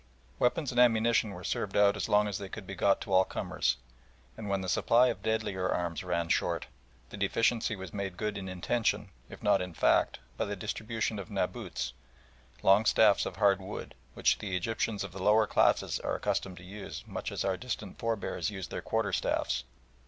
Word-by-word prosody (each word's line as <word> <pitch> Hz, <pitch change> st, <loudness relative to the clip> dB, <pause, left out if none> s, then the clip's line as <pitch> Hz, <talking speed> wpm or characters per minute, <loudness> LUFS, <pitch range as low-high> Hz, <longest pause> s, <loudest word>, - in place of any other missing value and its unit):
Weapons 135 Hz, +3 st, +1 dB
and 120 Hz, -, 0 dB
ammunition 115 Hz, -2 st, +4 dB
were 90 Hz, -2 st, -8 dB
served 95 Hz, -, -2 dB
out 100 Hz, 0 st, +5 dB
as 105 Hz, -, -3 dB
long 105 Hz, 0 st, +4 dB
as 100 Hz, -1 st, -3 dB
they 100 Hz, -1 st, -6 dB
could 105 Hz, -1 st, -8 dB
be 95 Hz, -, -7 dB
got 95 Hz, +1 st, +2 dB
to -, -, -4 dB
all 95 Hz, -, +7 dB
comers, -, -, -1 dB, 0.6 s
and 105 Hz, -2 st, -6 dB
when 100 Hz, -1 st, 0 dB
the 95 Hz, -, -4 dB
supply 120 Hz, +6 st, +4 dB
of 120 Hz, -, -4 dB
deadlier 110 Hz, -4 st, -1 dB
arms 85 Hz, -2 st, -1 dB
ran 85 Hz, +1 st, -1 dB
short, -, -, +1 dB, 0.5 s
the -, -, -7 dB
deficiency 115 Hz, +3 st, +1 dB
was 95 Hz, -3 st, -8 dB
made 100 Hz, -3 st, -4 dB
good 105 Hz, 0 st, -2 dB
in 95 Hz, -1 st, -5 dB
intention, 100 Hz, +6 st, -1 dB, 0.2 s
if -, -, -11 dB
not 100 Hz, -2 st, +4 dB
in 90 Hz, -2 st, -5 dB
fact, -, -, +3 dB, 0.2 s
by -, -, 0 dB
the 105 Hz, -, -3 dB
distribution 110 Hz, +2 st, -3 dB
of 95 Hz, -, -7 dB
naboots, 65 Hz, 0 st, -3 dB, 0.7 s
long 100 Hz, +3 st, +5 dB
staffs 105 Hz, -1 st, +5 dB
of -, -, -6 dB
hard 100 Hz, -2 st, +3 dB
wood, 95 Hz, +2 st, -7 dB, 0.2 s
which -, -, +2 dB
the 95 Hz, -3 st, -2 dB
Egyptians 110 Hz, +1 st, -1 dB
of 100 Hz, -, -6 dB
the 95 Hz, -, -8 dB
lower 105 Hz, +3 st, +5 dB
classes -, -, +2 dB
are -, -, -2 dB
accustomed 90 Hz, -2 st, -2 dB
to -, -, -11 dB
use 100 Hz, +2 st, -8 dB
much -, -, -5 dB
as -, -, -2 dB
our 95 Hz, -1 st, +1 dB
distant 105 Hz, -3 st, -5 dB
forebears 115 Hz, -1 st, -1 dB
used 95 Hz, -3 st, -6 dB
their -, -, -3 dB
quarter -, -, -1 dB
staffs. 65 Hz, +1 st, 0 dB
100 Hz, 195 wpm, -30 LUFS, 95-110 Hz, 0.7 s, all